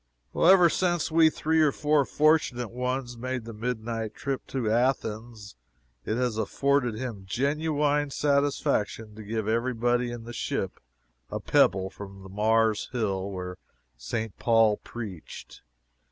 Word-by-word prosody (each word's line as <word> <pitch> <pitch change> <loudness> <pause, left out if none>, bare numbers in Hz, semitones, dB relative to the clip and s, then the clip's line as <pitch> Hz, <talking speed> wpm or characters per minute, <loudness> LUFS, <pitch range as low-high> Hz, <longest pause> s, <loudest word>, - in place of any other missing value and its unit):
Ever 180 0 +7
since 175 -1 0
we 160 0 +6
three 160 +1 +1
or 150 -2 +4
four 150 0 +2
fortunate 145 -7 +2
ones 125 0 -3
made 130 -1 -3
the 115 - -7
midnight 115 -1 -3
trip 135 -2 -4
to 130 -5 -2
Athens, 110 -3 -1 0.5
it 110 - -1
has 120 -3 -1
afforded 125 +2 +1
him 110 -6 -6
genuine 145 +3 0
satisfaction 140 -7 0
to 110 - -10
give 110 0 -3
every 115 +3 0
body 120 +1 +1
in 120 -1 -6
the 120 +1 -8
ship - - -3 0.5
a - - -3
pebble 95 0 +2
from 100 -1 -10
the 95 - -11
Mars 110 +2 +2
hill 100 -6 -1
where 90 -1 -6 0.4
St. 110 - -4
Paul 115 -2 +4
preached. 105 -8 -9
120 Hz, 140 wpm, -27 LUFS, 110-140 Hz, 0.5 s, Ever